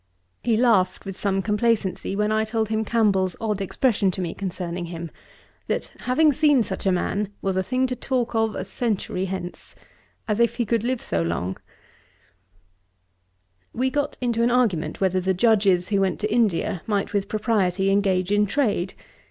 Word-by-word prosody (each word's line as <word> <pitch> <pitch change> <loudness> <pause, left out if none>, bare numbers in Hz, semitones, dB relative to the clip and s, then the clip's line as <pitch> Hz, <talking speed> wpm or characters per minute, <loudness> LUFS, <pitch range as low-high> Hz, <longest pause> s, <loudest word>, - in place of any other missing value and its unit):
He 230 -2 +2
laughed 220 -6 +2
with 195 -1 -5
some 195 -1 -1
complacency, 210 -3 0
when 210 +1 +1
I 215 0 +2
told 220 -1 -1
him 220 0 0
Campbell's 200 -5 +1
odd 210 -3 -2
expression 205 0 +1
to 185 - -4
me 175 -3 -2
concerning 180 -2 -4
him: 170 -1 -7 0.6
'That - - -2
having 295 +4 +4
seen 290 -3 +4
such 195 -1 -4
a - - +4
man, 195 +3 -1
was 195 -1 0
a 190 - +2
thing 255 +6 0
to 255 -1 -2
talk 250 -2 -1
of 225 -1 +1
a - - -4
century 210 -6 -2
hence,' 185 -2 -6 0.5
as 210 0 0
if 235 0 +3
he 240 -1 0
could 225 0 0
live 250 0 -1
so 85 - -1
long. 85 +3 -2 2.2
We 260 +2 0
got 290 +1 -1
into 235 -2 0
an 235 - +3
argument 195 -12 +1
whether 185 -1 +2
the 190 +1 0
Judges 195 -4 +3
who 200 -2 +2
went 190 -1 0
to 215 0 -1
India 210 -5 +1
might 205 -1 -1
with 200 -1 0
propriety 200 -4 +1
engage 195 -2 +1
in 205 0 +3
trade. 205 -7 0
205 Hz, 175 wpm, -24 LUFS, 185-230 Hz, 2.2 s, having